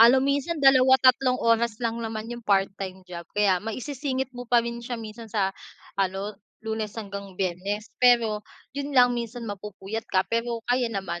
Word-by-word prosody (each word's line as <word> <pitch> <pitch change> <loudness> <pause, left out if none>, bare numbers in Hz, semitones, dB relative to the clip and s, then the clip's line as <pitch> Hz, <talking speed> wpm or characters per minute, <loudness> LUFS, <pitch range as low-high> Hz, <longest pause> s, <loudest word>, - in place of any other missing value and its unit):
Ano 235 +3 +8
minsan, 280 +4 0
2, 265 -2 +6
3, 255 0 +4
oras 230 -1 +2
lang 230 -1 -2
naman 220 -1 -4
yung 240 - -9
part-time 195 -2 0
job, 175 -1 -7
kaya 195 -3 +3
maisisingit 260 +3 -3
mo 245 - -6
pa 240 - +5
rin 235 0 -4
siya 240 0 -4
minsan 225 +1 -8
sa 195 -3 +1 0.4
ano, 195 +2 -1 0.3
Lunes 220 -1 -2
hanggang 200 -3 -7
Biyernes, 195 +4 -2
pero 235 -4 +5 0.3
'yon 280 0 -3
lang 245 -1 +7
minsan 235 0 -4
mapupuyat 210 +1 -6
ka 185 0 +3
pero 230 0 -1
kaya 245 0 +2
naman. 190 -5 -3
225 Hz, 165 wpm, -26 LUFS, 200-245 Hz, 0.4 s, Ano